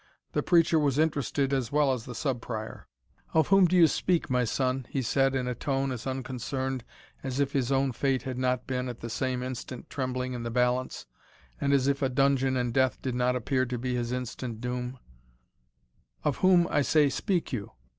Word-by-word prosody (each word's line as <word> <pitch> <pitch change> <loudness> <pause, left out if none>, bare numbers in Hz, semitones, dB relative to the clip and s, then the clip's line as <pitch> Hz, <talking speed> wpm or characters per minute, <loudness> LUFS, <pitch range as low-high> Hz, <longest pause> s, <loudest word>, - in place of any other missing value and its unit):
The - - 0
preacher 165 -2 +4
was 145 -3 +1
interested 145 -3 +1
as 130 -4 -1
well 145 -2 +3
as 120 -4 -5
the 125 - -7
Sub 130 -1 -2
Prior. 110 -2 -6 0.5
"Of 160 -3 +4
whom 195 -2 +6
do 180 - +1
you 175 -2 +8
speak, 165 -2 0
my 125 -1 +2
son?" 130 +2 -1
he 135 - -1
said, 135 +3 +2
in 130 -1 -1
a 125 - -1
tone 135 +2 -1
as 125 0 -5
unconcerned 130 0 -3 0.4
as 130 0 -3
if 140 -1 +1
his 135 -2 0
own 135 0 +2
fate 130 +1 0
had 130 -1 -4
not 125 -1 0
been 125 -1 -2
at 120 - -8
the 115 - -5
same 130 +1 -1
instant 130 0 -6
trembling 130 -1 -2
in 120 - -4
the 115 - -3
balance, 125 +1 0 0.5
and 140 - +1
as 135 -1 +3
if 140 0 +1
a 135 - +2
dungeon 135 0 +2
and 120 -1 -1
death 130 -1 +2
did 130 - -1
not 125 +1 +1
appear 130 +1 0
to 125 0 -3
be 125 +1 -2
his 120 -1 -2
instant 125 -2 -4
doom 125 +1 -4 1.3
"Of 145 -3 0
whom, 180 -2 +5
I 145 - +3
say, 150 +1 +4
speak 165 +5 -1
you? 105 -5 -4
130 Hz, 205 wpm, -28 LUFS, 125-140 Hz, 1.3 s, you